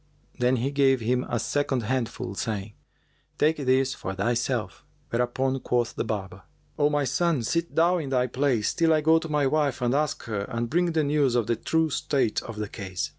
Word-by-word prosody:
Then 125 +1 +3
he 130 +3 -1
gave 135 -2 +3
him 125 +2 0
a 120 - 0
second 135 -1 -1
handful, 115 -5 -2
saying, 105 -1 -4 0.6
"Take 155 +2 +2
this 130 -1 +2
for 95 - -5
thyself." 115 0 -1 0.3
Whereupon 130 +3 0
quoth 120 -2 0
the - - -1
barber, 95 -3 -4 0.4
"O 145 0 +4
my 145 -1 +1
son, 150 +1 +1
sit 170 +7 -1
thou 175 +2 +3
in 145 -4 -4
thy 125 -2 +2
place, 125 -4 0
till 165 -1 +3
I 155 - +3
go 160 +2 +5
to 160 0 -7
my 150 -2 +1
wife 140 -2 +1
and 125 -1 +1
ask 150 +1 0
her 105 -4 -3
and 115 -1 -3
bring 175 +1 +2
the 160 -1 +2
news 140 -3 +2
of 120 -3 +2
the 115 +1 0
true 160 +7 0
state 135 -6 0
of 115 - -8
the 105 -1 -3
case." 95 -3 -4
130 Hz, 200 wpm, -26 LUFS, 115-150 Hz, 0.6 s, go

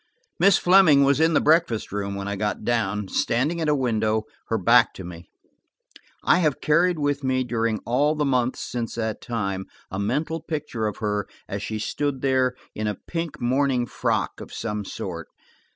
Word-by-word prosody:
Miss 200 -1 +6
Fleming 175 -6 +6
was 140 +1 +3
in 160 0 +3
the - - +6
breakfast 155 -8 +2
room 100 -1 -3
when 100 0 -4
I 100 - -2
got 105 +1 -2
down, 105 -4 0
standing 140 - 0
at 155 - +1
a 150 - +3
window, 110 -4 0 0.2
her 115 - 0
back 115 +4 +4
to 95 - -8
me. 85 0 -10 0.9
I - - +4
have 155 -6 +1
carried 170 +3 +3
with 145 -1 -1
me, 130 -1 +1
during 115 -2 -1
all 145 +6 +2
the 150 -1 0
months 130 -2 0
since 120 -2 -4
that 110 -2 -3
time, 100 -5 -3 0.2
a 95 - -3
mental 155 +10 -1
picture 150 -9 -3
of 105 - -4
her 105 -2 -2 0.2
as 100 - -4
she 110 +2 -3
stood 135 +5 -2
there, 130 -2 +2 0.2
in 110 0 -3
a 105 - -1
pink 165 -3 -4
morning 130 0 +1
frock - - -2
of - - -9
some 105 -2 -3
sort. 85 -4 -6
120 Hz, 185 wpm, -24 LUFS, 105-150 Hz, 0.9 s, Miss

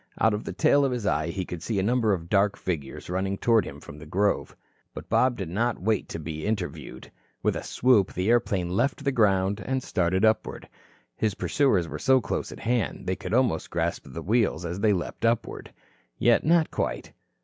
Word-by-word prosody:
Out 110 -1 +4
of 105 - -3
the - - -4
tail 140 0 +3
of 135 - +1
his 120 -4 -3
eye - - +1
he 90 +2 -3
could 85 -2 -7
see 110 +3 -2
a 95 - +1
number 115 0 +2
of 85 -4 -2
dark 100 +2 +2
figures 75 -7 -4
running 95 +2 -2
toward 115 -3 +3
him - - -8
from 75 - -11
the 75 - -11
grove. 100 +5 0 0.4
But - - -8
Bob 125 -1 +3
did 95 -5 -4
not 115 +6 -1
wait 105 +2 0
to - - -5
be 80 -1 -6
interviewed. 110 0 -4 0.3
With - - +1
a - - -3
swoop, 120 -6 +2
the 90 +2 -2
airplane 100 -6 +1
left 130 +8 0
the 140 - +1
ground 100 -4 +2
and 130 0 -2
started 95 +2 +1
upward. 110 0 0 0.5
His 105 -2 -1
pursuers 105 - +1
were - - -6
so 130 -1 +4
close 120 - -3
at - - -10
hand 115 -6 -1
they 95 - -1
could 90 +4 -3
almost 120 -11 +1
grasp - - -2
the - - -7
wheels, 105 -6 +1
as 85 +2 -4
they 105 0 +3
leaped 90 +2 -3
upward. 115 0 -1 0.5
Yet 120 -1 +3
not 165 0 +3
quite. - - -3
105 Hz, 205 wpm, -26 LUFS, 90-120 Hz, 0.5 s, Out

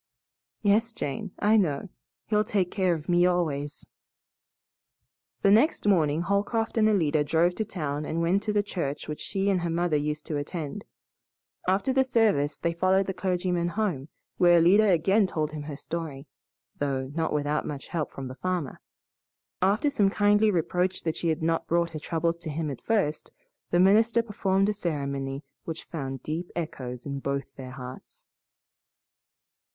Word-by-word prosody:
"Yes, 220 +3 +3
Jane, 170 +4 -4
I 215 +2 +4
know. 175 -2 0 0.4
He'll 210 -1 +2
take 195 -4 0
care 185 -4 +1
of 155 -1 -8
me 175 0 +4
always." 150 -5 -1 1.6
The 195 - +5
next 225 +2 +3
morning 160 -5 +3
Holcroft 205 +4 0
and 215 0 +5
Alida 160 -7 +2
drove 165 +4 +2
to 220 - -1
town 150 -6 -3
and 160 +2 -2
went 175 +4 +2
to 215 - -2
the 205 -1 +2
church 165 -8 -4
which 150 - -5
she 195 0 -1
and 185 -2 +1
her 170 - -1
mother 170 -1 +1
used 150 +1 -3
to 150 - -2
attend. 145 0 -5 0.8
After 195 +8 +2
the 265 0 +4
service 215 - +2
they 170 0 -1
followed 185 +3 +2
the 190 - -3
clergyman 180 -2 0
home, 175 -7 -2 0.3
where 175 -1 +6
Alida 195 +6 +5
again 190 +4 +3
told 155 -4 -2
him 155 -1 -5
her 145 -1 -6
story, 155 -4 -5 0.5
though 135 -2 -2
not 160 +1 -1
without 150 0 0
much 140 -2 -6
help 160 -4 -2
from 135 -1 -6
the 130 - -7
farmer. 180 -1 -3 0.8
After 210 +10 +2
some 205 -7 +3
kindly 205 +1 +3
reproach 180 0 0
that 160 -1 -1
she 170 - -2
had 160 0 0
not 165 0 0
brought 170 0 +1
her 155 - -5
troubles 165 +1 -1
to 165 - -6
him 155 0 -2
at 135 - -7
first, 200 -10 0 0.4
the 175 - +2
minister 220 +5 +5
performed 195 -3 +1
a 210 - +1
ceremony 140 -6 -3 0.2
which 165 -1 -5
found 135 -5 -5
deep 165 +3 -4
echoes 125 -7 -5
in 140 -1 -4
both 140 0 -3
their 130 -2 -8
hearts. 130 0 -10
170 Hz, 165 wpm, -27 LUFS, 150-195 Hz, 1.6 s, where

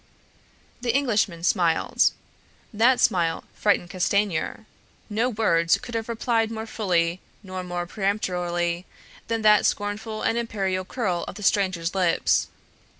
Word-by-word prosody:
The 240 -1 0
Englishman 215 -11 +1
smiled. 170 -3 +3 0.6
That 240 +4 +4
smile 175 -9 +2
frightened 200 -4 +1
Castanier. 200 +1 0 0.5
No 225 +4 +1
words 170 -8 +2
could 240 - -10
have 225 0 -3
replied 230 -1 0
more 220 0 -5
fully 180 -5 0 0.2
nor 185 -1 -6
more 175 -1 -3
peremptorily 180 -3 -1 0.4
than 225 -1 -1
that 210 -1 +6
scornful 215 +1 -3
and 235 - +1
imperial 195 -5 -2
curl 185 -6 -2
of - - -7
the 210 - -8
stranger's 185 -4 +1
lips. 180 -3 +2
200 Hz, 125 wpm, -25 LUFS, 175-220 Hz, 0.6 s, that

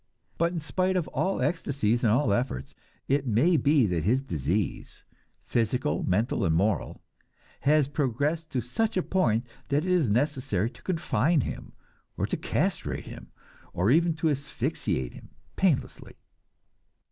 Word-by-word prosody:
But 170 +1 +2
in 175 - -3
spite 185 +5 0
of 170 - -1
all 190 +1 0
ecstasies 130 -8 0
and 110 - +4
all 120 -2 +3
efforts, 120 - -2 0.3
it 140 0 +1
may 125 +11 +3
be 145 -4 +4
that 90 -5 -1
his 125 +9 +2
disease 85 - -3 0.4
physical, 115 - 0
mental 105 +4 0
and 80 -4 +2
moral 100 +5 0 0.6
has 150 -1 +3
progressed 145 +3 -1
to 125 - +1
such 215 - -1
a 185 - +2
point 120 - +1 0.2
that 145 +3 +1
it 185 - 0
is 170 -10 +3
necessary 125 -4 0
to 120 - -18
confine 165 - +1
him, - - -6 0.4
or - - 0
to - - -2
castrate - - -2
him, - - -10 0.5
or 95 +6 +2
even 165 +2 +3
to 160 0 +1
asphyxiate 130 - -2
him - - -13 0.3
painlessly. - - 0
135 Hz, 145 wpm, -27 LUFS, 110-160 Hz, 0.6 s, and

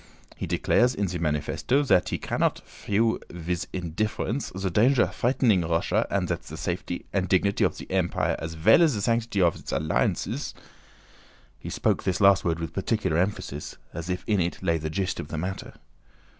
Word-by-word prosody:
He - - -5
declares 125 +1 +2
in 100 -1 0
ze 90 -1 -3
manifessto 80 - 0
zat 90 -9 +3
he - - -1
cannot - - -1
fiew 110 +2 0
wiz 90 0 -3
indifference 105 - -2
ze 95 -1 -2
danger 120 +7 +4
vreatening 115 -7 +2
Russia 85 0 +1
and - - 0
zat - - -2
ze 80 - -9
safety 90 0 -4
and 95 -2 0
dignity 100 +2 +2
of - - +2
ze - - -8
Empire 95 -2 +1
as 80 0 -5
vell 105 - +5
as 160 -4 +4
ze 105 - -2
sanctity 115 -3 +1
of 85 -2 +3
its - - -8
alliances..." 80 +2 -1 1.0
he - - -7
spoke - - 0
this 95 -2 -1
last 100 -2 +5
word 85 -1 0
with 80 -2 -5
particular 80 - 0
emphasis 90 -6 -3 0.2
as 85 +2 -6
if 90 0 -2
in 105 -3 +1
it 85 +2 -2
lay 85 -3 +1
the 80 +1 -3
gist 90 +4 -2
of - - -5
the 80 - -5
matter. 95 +4 -5
90 Hz, 185 wpm, -26 LUFS, 85-105 Hz, 1.0 s, vell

